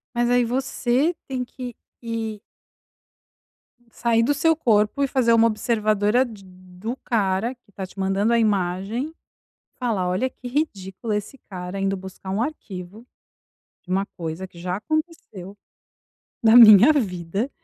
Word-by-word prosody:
Mas 240 Hz, 0 st, +1 dB
aí 245 Hz, 0 st, +4 dB
você 260 Hz, +5 st, 0 dB
tem 260 Hz, -2 st, -3 dB
que 245 Hz, -1 st, -8 dB, 0.3 s
ir 225 Hz, -2 st, -4 dB, 1.5 s
Sair 230 Hz, 0 st, +1 dB
do 290 Hz, +5 st, +2 dB
seu 325 Hz, +3 st, +3 dB
corpo 220 Hz, -1 st, +2 dB
e 275 Hz, -, +2 dB
fazer 250 Hz, -3 st, +2 dB
uma 230 Hz, 0 st, +5 dB
observadora 215 Hz, +1 st, +1 dB
de 215 Hz, -5 st, -11 dB
do 185 Hz, +5 st, -8 dB
cara, 210 Hz, +1 st, 0 dB
que 225 Hz, -4 st, -30 dB
tá 195 Hz, -, -6 dB
te 185 Hz, -, -13 dB
mandando 195 Hz, +3 st, +1 dB
a 235 Hz, -, +4 dB
imagem, 205 Hz, -, -1 dB, 0.7 s
falar: 220 Hz, -8 st, -1 dB
"Olha 185 Hz, +9 st, 0 dB
que 255 Hz, -, -10 dB
ridículo 220 Hz, -6 st, -3 dB
esse 210 Hz, +6 st, -4 dB
cara, 180 Hz, +1 st, -6 dB
indo 195 Hz, 0 st, 0 dB
buscar 190 Hz, 0 st, -10 dB
um 205 Hz, -, 0 dB
arquivo, 210 Hz, -, -6 dB, 0.8 s
de -, -, -10 dB
uma 195 Hz, +1 st, +1 dB
coisa 165 Hz, +2 st, -5 dB
que 180 Hz, -, -19 dB
já 180 Hz, +1 st, -3 dB
aconteceu 305 Hz, -, -4 dB, 0.9 s
na 225 Hz, 0 st, +5 dB
minha 225 Hz, +2 st, +10 dB
vida, 195 Hz, -, -2 dB
215 Hz, 145 wpm, -23 LUFS, 190-245 Hz, 1.5 s, minha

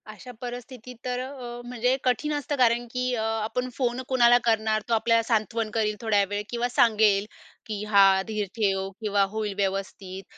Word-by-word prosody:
अशा 215 Hz, +4 st, -10 dB
परिस्थितीत 245 Hz, 0 st, -8 dB
तर 250 Hz, 0 st, -2 dB
अ 255 Hz, -, -3 dB
अ, 245 Hz, -3 st, -8 dB
म्हणजे 250 Hz, +1 st, 0 dB
कठीण 255 Hz, +4 st, +1 dB
असतं 290 Hz, 0 st, -2 dB
कारण 240 Hz, -1 st, +3 dB
की 250 Hz, 0 st, -1 dB
अ, 225 Hz, -, -2 dB
आपण 225 Hz, +3 st, -2 dB
फोन 250 Hz, -1 st, -1 dB
कुणाला 245 Hz, -2 st, +5 dB
करणार. 220 Hz, -1 st, +2 dB
तो -, -, +1 dB
आपल्याला 230 Hz, 0 st, +3 dB
सांत्वन 225 Hz, -1 st, -1 dB
करील 215 Hz, -1 st, 0 dB
थोड्या 215 Hz, -3 st, +2 dB
वेळ, 205 Hz, 0 st, -2 dB
किंवा 240 Hz, 0 st, -1 dB
सांगेल 215 Hz, -4 st, +3 dB, 0.4 s
की 210 Hz, -2 st, -4 dB
"हां 195 Hz, -2 st, +6 dB
धीर 215 Hz, -2 st, -2 dB
ठेव, 195 Hz, -3 st, 0 dB
किंवा 205 Hz, -2 st, +2 dB
होईल 215 Hz, -2 st, -2 dB
व्यवस्थित". 195 Hz, -1 st, -3 dB
225 Hz, 175 wpm, -26 LUFS, 210-245 Hz, 0.4 s, हां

